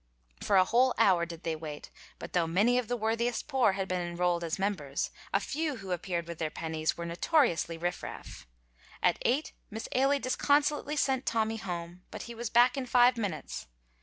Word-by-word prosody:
For 200 - +1
a 185 - +6
whole 250 +5 +3
hour 175 -3 +4
did 170 0 -9
they 165 -1 -1
wait, 155 -2 -8 0.3
but - - -9
though 175 -2 +2
many 210 +9 +3
of 245 - -4
the 245 - -1
worthiest 230 +2 -1
poor 260 -8 +3
had 195 0 -2
been 185 -1 -1
enrolled 175 0 0
as 165 -1 -2
members, 185 -9 -2 0.2
the 195 - +3
few 300 +7 -2
who 195 -5 -8
appeared 175 -1 -2
with 170 -1 -7
their 160 -2 -1
pennies 160 0 -2
were 170 - -4
notoriously 170 - +1
riff 175 +2 -2
raff. - - -9 0.6
At - - +3
eight 275 +6 0 0.2
Miss 220 0 -6
Ailie 275 +2 +3
disconsolately 290 +3 +1
sent 265 -2 0
Tommy 225 0 +1
home, 175 -3 -6
but - - -7
he 235 - -8
was 235 -1 -4
back 245 +4 +5
in 260 -2 -3
five 245 0 +5
minutes. 195 - -4
200 Hz, 195 wpm, -30 LUFS, 170-245 Hz, 0.6 s, a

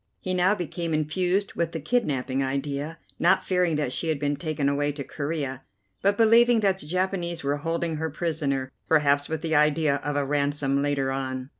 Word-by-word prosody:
He 185 - -3
now 185 +3 +3
became 170 -2 -3
infused 180 +6 0
with 170 -1 -2
the 165 - -3
kidnapping 140 - 0
idea, 140 +3 -3 0.2
not 170 - +4
fearing 180 -3 +1
that 145 -4 -1
she 165 - -2
had 155 - +1
been 145 0 -1
taken 150 -1 -2
away 145 +1 +1
to 140 -1 -5
Corea, 140 -3 -4 0.4
but 200 +1 +2
believing 230 +1 +5
that 195 -2 +2
the 150 - -9
Japanese 175 -1 -1
were 140 +1 0
holding 165 +1 -2
her 160 +1 -2
prisoner, 145 -5 -2 0.2
perhaps 145 -2 +3
with 160 0 -3
the 160 -1 -1
idea 150 -1 +3
of 145 0 -4
a 145 -1 +1
ransom 140 -1 0
later 140 -2 0
on. 130 -1 -4
150 Hz, 185 wpm, -26 LUFS, 140-170 Hz, 0.4 s, believing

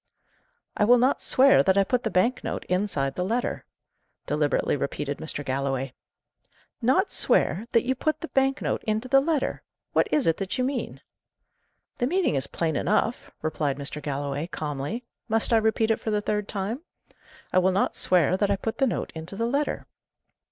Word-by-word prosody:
"I - - +1
will 245 +4 +6
not 255 +3 +2
swear 270 +2 +5
that 190 0 +2
I 200 - +5
put 245 +5 0
the 220 - -2
bank 225 +7 +1
note - - -4
inside 180 -8 -1
the 180 - -2
letter," 235 +6 -2 0.6
deliberately 150 -1 +1
repeated 145 0 -3
Mr. 145 -2 -1
Galloway. 135 0 -2 0.9
"Not 265 - +2
swear 215 +6 +2
that 230 -2 +3
you 255 +1 +1
put 310 +4 -2
the 330 - -4
bank 270 0 +1
note - - -1
into 220 +3 -1
the 270 +1 +5
letter? 300 -1 -1 0.3
What - - +3
is 295 - +2
it 165 - +2
that 195 -1 -3
you 255 - +1
mean?" 260 0 -3 1.0
"The 245 - +1
meaning 365 - +1
is 135 -1 -1
plain 160 -2 -2
enough," 215 +7 0
replied 150 -3 -1
Mr. 145 +1 -3
Galloway, 145 +1 -3
calmly. 155 - -4 0.3
"Must 225 +2 +2
I - - +6
repeat 220 0 +2
it 225 - +1
for - - -4
the 210 -1 +1
third 210 0 -2
time? 210 +7 -3 0.7
I 185 - +5
will 185 +1 +3
not 190 - 0
swear 180 -1 +3
that 205 0 +1
I - - +3
put 220 +5 -4
the 270 - +3
note - - -3
into 160 +4 -7
the 230 +3 -1
letter." 280 +5 -1
210 Hz, 185 wpm, -26 LUFS, 155-245 Hz, 1.0 s, will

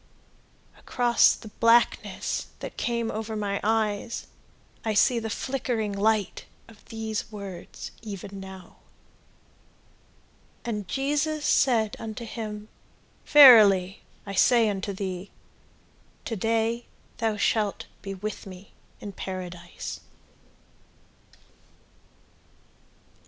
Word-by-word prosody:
Across 240 -1 +3
the 220 - -11
blackness 230 +1 +2
that - - -8
came 235 -1 -1
over 220 +1 -4
my 200 -1 -2
eyes 220 0 0 0.6
I 220 -2 -1
see 235 +3 +4
the 220 -1 -4
flickering 235 -3 -2
light 210 0 0 0.2
of 225 -2 -17
these 220 -1 -4
words 195 -4 -8
even 200 -2 -7
now: 190 -2 -11 1.9
"And 210 -5 -3
Jesus 295 - -1
said 225 -5 +3
unto 225 +1 -6
him, 215 -2 -6 0.6
Verily 210 -10 +8 0.2
I 200 - -6
say 230 +3 +4
unto 200 0 -3
thee, 190 -1 -5 1.0
To 225 - -3
day 225 +3 0 0.3
thou 220 -2 0
shalt 210 0 0 0.2
Be 195 -1 -6
with 210 +1 -6
me 185 +1 -12 0.3
in 205 - -7
paradise." 180 -2 -7
215 Hz, 95 wpm, -26 LUFS, 200-230 Hz, 1.9 s, Verily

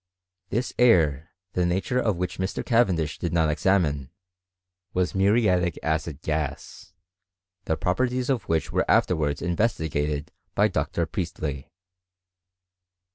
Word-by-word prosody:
This 120 +4 -1
air, 80 - +4 0.2
the 90 - +1
nature 95 +8 0
of 105 -5 +1
which 90 +1 -3
Mr. 95 +1 -2
Caven 115 -6 +3
dish 80 -2 -3
did 85 - -2
not 80 -3 +2
examine, 75 -6 +1 0.9
was 90 -1 +1
mufiatic 95 -4 +2
acid 80 -2 -2
gas, 75 +3 -4 0.7
the 80 - 0
pro 90 - +1
perties 125 +2 0
of 125 -8 -1
which 80 -3 0
were - - 0
afterwards 75 -5 +2
investigated 80 -6 -1 0.2
by - - +4
Dr. 85 - -1
Priestley. 80 -6 -4
85 Hz, 125 wpm, -25 LUFS, 75-100 Hz, 0.9 s, air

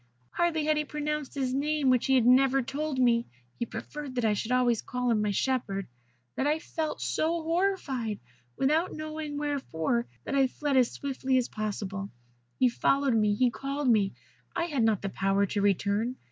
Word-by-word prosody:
"Hardly 320 -3 +1
had 305 0 +2
he 300 - +1
pronounced 300 -1 -3
his 260 -2 -1
name, 290 0 +2
which 250 -2 +2
he 265 - +4
had 245 -3 +4
never 265 +1 +5
told 290 +2 -3
me 240 -2 +3 0.3
(he 235 - -1
preferred 285 +1 -7
that 245 -2 0
I 215 - +3
should 220 +3 -3
always 245 -3 +3
call 250 -1 -1
him 215 -2 +2
my 210 - +1
shepherd), 200 -3 -1 0.5
than 270 - 0
I 300 +1 +2
felt 315 -1 -4
so 330 +1 0
horrified, 320 - -1 0.4
without 310 +6 +2
knowing 310 -1 -5
wherefore, 245 - -1 0.2
that - - -4
I 270 -1 +4
fled 285 +2 -2
as 255 -2 +5
swiftly 265 -1 -1
as 250 - 0
possible. 200 -2 -4 0.5
He 255 - +4
followed 275 +2 +2
me; 210 -2 +3
he 245 +2 +3
called 275 +1 -2
me. 205 -4 +3 0.4
I 340 - +1
had 300 -7 -1
not 220 -3 +2
the 195 - -1
power 195 +1 +1
to 200 +1 -2
return. 205 +4 +1
260 Hz, 185 wpm, -28 LUFS, 225-295 Hz, 0.5 s, never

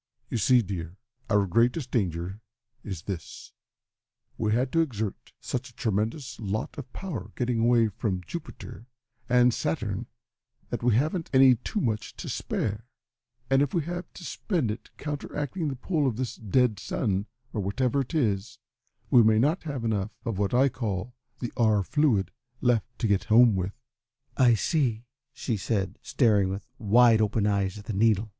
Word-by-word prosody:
"You 120 - 0
see, 125 +3 +5
dear, 90 -2 -5 0.3
our 105 -3 +3
greatest 120 - +1
danger 95 -1 -1 0.4
is 95 -7 -6
this: 95 -5 -7 0.8
we 110 -2 0
had 125 +4 +1
to 165 - +2
exert 110 -10 -3
such 130 +1 -4
a 120 - -22
tremendous 110 +5 -2
lot 105 0 -3
of 130 -3 -9
power 135 - -5
getting 120 -2 0
away 115 0 +4
from 95 -3 -2
Jupiter 150 - -8 0.4
and 125 -1 +5
Saturn, - - -2 0.6
that - - -2
we 120 -2 +3
haven't 155 - 0
any 130 -1 +7
too 125 - -3
much 110 - -2
to - - -7
spare, 105 +3 -3 0.6
and 135 +1 +3
if 145 +2 0
we 170 - +2
have 175 +3 -5
to 175 - -10
spend 160 - -1
it 110 - -8
in - - -44
counteracting 150 +3 -3
the 140 - -2
pull 150 +2 0
of 120 - 0
this 130 -2 -3
dead 115 0 +1
sun, 100 -3 -1 0.3
or 105 - -1
whatever 125 +8 0
it 135 +5 -5
is, 110 -7 0 0.5
we 125 -4 +8
may 110 -1 +5
not 150 +10 +2
have 140 -6 -3
enough 105 -2 0 0.2
of 110 -5 -2
what 100 -1 +1
I 130 +3 +4
call 115 -3 -3 0.2
the 120 - -5
R. 110 -4 +3
fluid 130 - +2 0.3
left 120 -3 +2
to 115 - 0
get 100 -2 +1
home 115 -1 +6
with." 95 +3 -3 0.6
"I 120 -3 +5
see," 120 -3 0 0.3
she 125 -4 -2
said, 100 -1 -2
staring 105 -7 +2
with 95 +1 -5
wide 115 0 +5
open 105 0 +1
eyes 100 -1 0
at 105 - -10
the 115 - -3
needle. 110 +1 +2
115 Hz, 170 wpm, -27 LUFS, 105-130 Hz, 0.8 s, we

